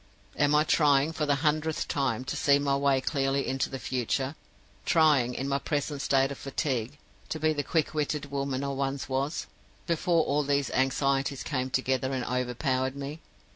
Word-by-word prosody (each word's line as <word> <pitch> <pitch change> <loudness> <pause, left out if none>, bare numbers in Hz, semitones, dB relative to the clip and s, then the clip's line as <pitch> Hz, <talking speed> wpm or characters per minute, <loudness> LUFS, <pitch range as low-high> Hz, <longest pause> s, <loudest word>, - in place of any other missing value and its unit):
Am 145 +1 +3
I 150 - +5
trying, 150 -1 +3
for 155 -2 -2
the 145 - +3
hundredth 155 +1 0
time, 130 -4 -1
to 135 - -3
see 140 -1 +4
my 140 -1 +1
way 140 -1 +2
clearly 135 -1 0
into 135 0 -1
the 135 - -5
future 130 +3 -2 0.5
trying, 145 -7 +3
in 135 - -3
my 140 0 0
present 145 0 -2
state 135 0 +2
of 140 - -7
fatigue, 135 -2 -2 0.3
to 160 - -3
be 155 0 +2
the 145 - -1
quick 155 +2 0
witted 150 -1 -2
woman 140 -1 -2
I 140 - -2
once 135 0 -2
was, 135 +4 -2 0.4
before 170 0 +2
all 145 +2 +1
these 140 0 0
anxieties 135 +1 +1
came 130 -3 -2
together 130 0 0
and 130 -2 -2
overpowered 130 +1 -1
me? 140 +3 -6
140 Hz, 175 wpm, -28 LUFS, 130-145 Hz, 0.5 s, I